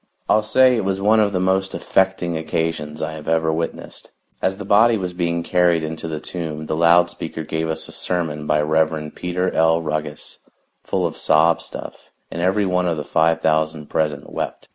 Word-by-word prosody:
I'll 110 - +4
say 130 +4 +4
it 110 - -1
was 95 0 -1
one 105 +3 +4
of 105 -1 +3
the 95 - -1
most 95 +1 0
affecting 95 -3 0
occasions 80 -1 -3
I - - -2
have 80 -1 -9
ever 80 0 +1
witnessed. 80 +1 -5 0.3
As 95 0 0
the 105 - -7
body 110 +3 +5
was 90 -3 -4
being 85 -1 -1
carried 90 -2 +2
into 80 +1 -5
the 80 -1 -4
tomb 80 -2 -5
the 80 - -2
loud 85 +1 +4
speaker 80 -2 -6
gave 80 +1 -3
us 80 0 -3
a - - -11
sermon 80 -4 -3
by 75 0 +2
Rev. 80 0 0
Peter 90 +1 -2
L. 80 0 +3
Ruggus, 75 -2 -5 0.4
full - - -1
of - - -3
sob 80 +2 +3
stuff, - - -9 0.2
and 85 - -4
every 95 +3 +2
one 90 -1 +1
of 85 -2 0
the 75 - -4
five 80 0 +2
thousand 80 -1 0
present 75 -3 -1
wept. - - -5
80 Hz, 195 wpm, -21 LUFS, 80-90 Hz, 0.4 s, body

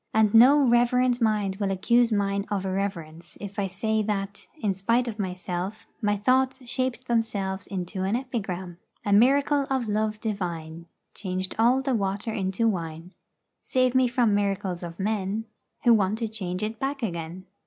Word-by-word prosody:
And 220 -1 +4
no 250 +6 +8
reverent 245 +1 +3
mind 210 -4 +1
will 200 -1 -1
accuse 235 +5 +3
mine 200 -1 0
of 200 -2 -2
irreverence 175 -4 -4
if 200 0 -6
I 195 - 0
say 220 +4 -1
that, 200 -1 -3
in 205 -6 0
spite 230 +6 +1
of 220 -2 -5
myself, 185 +2 -4 0.2
my 205 -1 +1
thoughts 260 +3 +1
shaped 255 0 -2
themselves 200 -5 -1
into 185 0 -4
an 195 +4 0
epigram: 190 -9 -4 0.3
A 205 - +2
miracle 275 +5 +4
of 260 -4 0
Love 215 0 -1
Divine 170 -6 -4 0.3
Changed 185 -1 -3
all 250 +4 +4
the 265 -1 0
water 200 +1 -1
into 195 +2 0
wine: 165 -3 -3 0.5
Save 255 -1 +1
me 260 -1 +4
from 240 -3 +2
miracles 195 -3 -1
of 170 0 -8
men, 205 +1 -1 0.4
Who 240 - +6
want 210 -1 +2
to 230 -1 -2
change 190 -3 -4
it 220 +1 -3
back 270 -1 -3
again. 170 -2 -4
205 Hz, 165 wpm, -26 LUFS, 190-235 Hz, 0.5 s, no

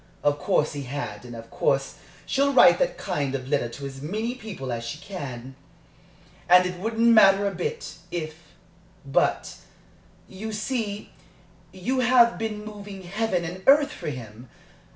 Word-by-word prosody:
Of 145 0 +2
course 150 - +1
he 140 -2 -5
had 140 -1 -5
and 120 -1 -9
of 115 0 -11
course 135 0 0 0.3
she'll 280 +1 +1
write 265 - +7
that - - 0
kind 145 -8 -2
of 130 -1 -5
letter 140 -4 0
to 140 +4 -8
as 135 -1 -8
many 215 - -2
people 205 - -7
as 115 -1 -3
she 120 +5 -5
can. 135 -9 -7 1.0
And 180 +1 +7
it 180 -1 -4
wouldn't 225 +3 +1
matter 200 -3 +6
a 200 - -1
bit, 175 -1 -4
if 160 -3 -4 0.7
But, 135 - 0 0.7
you 215 +3 -7
see, 215 -2 -3 0.6
you 220 +8 -2
have 245 -2 +5
been 215 -1 -4
moving 205 -2 -9
heaven 190 -1 -1
and 180 +3 -6
earth 285 +1 +6
for - - -5
him! 120 -2 -9
185 Hz, 155 wpm, -25 LUFS, 140-220 Hz, 1.0 s, write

